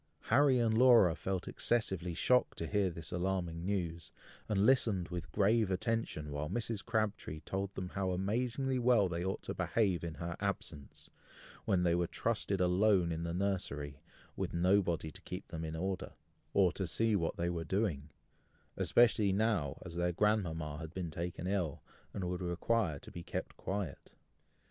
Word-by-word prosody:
Harry 135 +2 +4
and 115 -2 +2
Laura 115 -8 +7
felt 95 +1 -3
excessively 95 -7 0
shocked 125 +7 +2
to 85 - -3
hear 100 +2 +1
this 80 -2 -8
alarming 90 -2 -1
news, 85 -4 -2 0.4
and 100 -1 +2
listened 110 -8 +3
with 90 -1 -5
grave 110 +1 +3
attention, 95 -6 -1
while 75 +1 -3
Mrs. 115 -3 -3
Crabtree 110 -8 -2
told 95 +2 -3
them 90 -1 -4
how 95 0 -2
amazingly 120 +8 0
well 120 -5 +4
they 85 -1 -3
ought 95 +1 -2
to - - -4
behave 95 -7 +1
in 85 -2 -4
her 85 +3 -4
absence, 90 -7 -4 0.5
when 90 -2 +2
they 85 -1 +3
were 85 0 +1
trusted 105 -3 -1
alone 90 0 +3
in 80 0 -2
the 85 0 -2
nursery, 85 -7 -2 0.3
with - - -3
nobody 85 -3 +2
to - - -12
keep 90 +2 -7
them 80 -1 -5
in 80 0 -4
order, 95 +2 -3 0.4
or 95 -3 +4
to 95 - -3
see 110 +7 +1
what 85 -4 -1
they 85 +1 0
were 85 -1 -3
doing, 80 -5 -1 0.7
especially 110 -4 +4
now, 100 -9 +1
as 85 - -8
their 90 0 +1
grandmama 85 -6 0
had 80 -2 -7
been 90 -3 -3
taken 85 +2 -4
ill, 90 -6 -1 0.3
and 95 - -4
would 90 +1 -3
require 90 0 0
to - - -12
be 85 - -7
kept - - -5
quiet. 95 -7 -4
95 Hz, 170 wpm, -34 LUFS, 85-105 Hz, 0.7 s, Laura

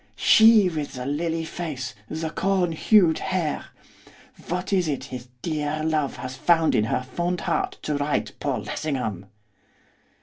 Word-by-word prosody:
She 220 -3 +6
with 155 -4 -3
the 125 -1 -5
lily 165 +3 -1
face, 150 -8 -5 0.2
the 160 0 -3
corn 190 -2 +1
hued 170 0 +4
hair! 180 -5 -2 0.8
What 180 +3 -2
is 180 -3 +2
it 145 -3 -2
his 125 -1 -8 0.2
dear 155 -1 -2
love 155 -3 0
has 130 0 -6
found 165 +4 +3
in 105 - +3
her 120 - -1
fond 175 +7 -2
heart - - -1
to 150 -1 -1
write 145 0 -1
Paul - - -2
Lessingham? 125 - -3
155 Hz, 145 wpm, -24 LUFS, 140-175 Hz, 0.8 s, She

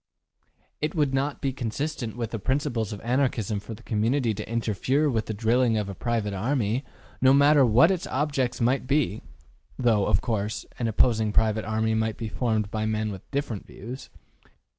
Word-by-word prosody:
It 150 +3 -1
would 145 -4 +1
not 140 +2 -1
be 135 -1 -1
consistent 125 0 -3
with 115 -2 -3
the 115 - -3
principles 130 - -1
of 105 - -6
Anarchism 120 -4 0
for 110 +2 -8
the - - -16
community 115 +2 +1
to 100 - -6
interfere 115 +6 +1
with 110 -3 -1
the 110 - -2
drilling 115 +2 +2
of 105 -2 -2
a - - -4
private 110 -1 -2
army, 115 +3 0 0.4
no 130 +1 +6
matter 140 0 +6
what 125 - +5
its 185 -3 -2
objects 135 -3 -1
might 130 +2 +1
be 135 -8 +1 0.6
(though, 115 -5 +2
of - - +3
course, 105 -2 -2
an 120 - 0
opposing 110 -1 +2
private 110 0 +2
army 110 +1 0
might 110 -1 0
be 110 -2 -4
formed 110 -3 -1
by 110 0 -1
men 110 0 -1
with 95 -2 -10
different 140 -7 -3
views). 125 +6 -9
115 Hz, 180 wpm, -26 LUFS, 110-135 Hz, 0.6 s, no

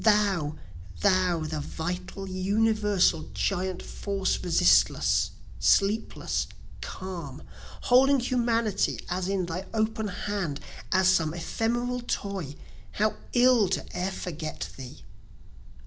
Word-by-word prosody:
Thou! 200 -8 +3 0.5
thou! 185 -4 +3
the 155 0 -3
vital, 180 +6 -5
universal, 200 -3 +2
giant 185 -2 -1
force 195 -2 -2
resistless, 175 0 +4 0.3
sleepless, 205 +3 +1 0.3
calm, 170 -7 -7 0.4
Holding 270 +2 +5
Humanity 235 -4 +1
as 180 +1 -1
in 195 -2 0
thy 175 +2 -4
open 220 0 0
hand, 185 -6 -3 0.3
as 190 -1 +4
some 165 -4 +3
ephemeral 240 +8 -1
toy, 195 - -3 0.4
How 215 +1 +1 0.2
ill 245 -5 +5
to - - -1
e'er 180 +2 -1
forget 160 -4 -5
thee! 130 -2 -10
190 Hz, 100 wpm, -27 LUFS, 175-215 Hz, 0.5 s, Holding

